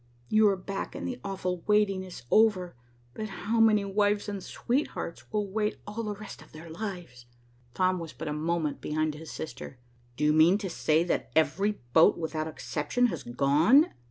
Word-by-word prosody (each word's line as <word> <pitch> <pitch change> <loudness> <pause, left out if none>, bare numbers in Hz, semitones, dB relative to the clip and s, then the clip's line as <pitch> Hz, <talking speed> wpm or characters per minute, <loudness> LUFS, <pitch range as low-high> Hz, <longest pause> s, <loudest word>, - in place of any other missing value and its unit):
"You 215 0 +5
are 195 - +1
back 195 +1 -5
and - - -4
the 250 -1 -5
awful 185 -3 -3
waiting 210 -2 +3
is 185 -7 -10
over, 200 - +3 0.4
but 215 0 -5
how 215 +5 -2
many 215 -2 +5
wives 205 +1 +1
and 200 -2 -4
sweethearts 240 - -3
will 210 -2 -1
wait 210 +2 -1
all 210 +2 -5
the 210 -2 -3
rest 210 0 -10
of - - -17
their 160 +1 -10
lives!" 170 - -7 0.5
Tom 185 -1 +2
was 165 -2 -7
but 160 - -7
a 150 - -2
moment 155 -1 -1
behind 155 0 -1
his 155 +2 -10
sister. 135 -2 -7 0.4
"Do - - -2
you 150 0 +4
mean 160 +5 +5
to 200 -4 -5
say 160 0 +2
that 175 - -1
every 195 +6 +1
boat, 160 - +6
without 160 -1 -3
exception, 160 +9 -1
has - - -5
gone?" 150 - +4
185 Hz, 185 wpm, -28 LUFS, 160-210 Hz, 0.5 s, boat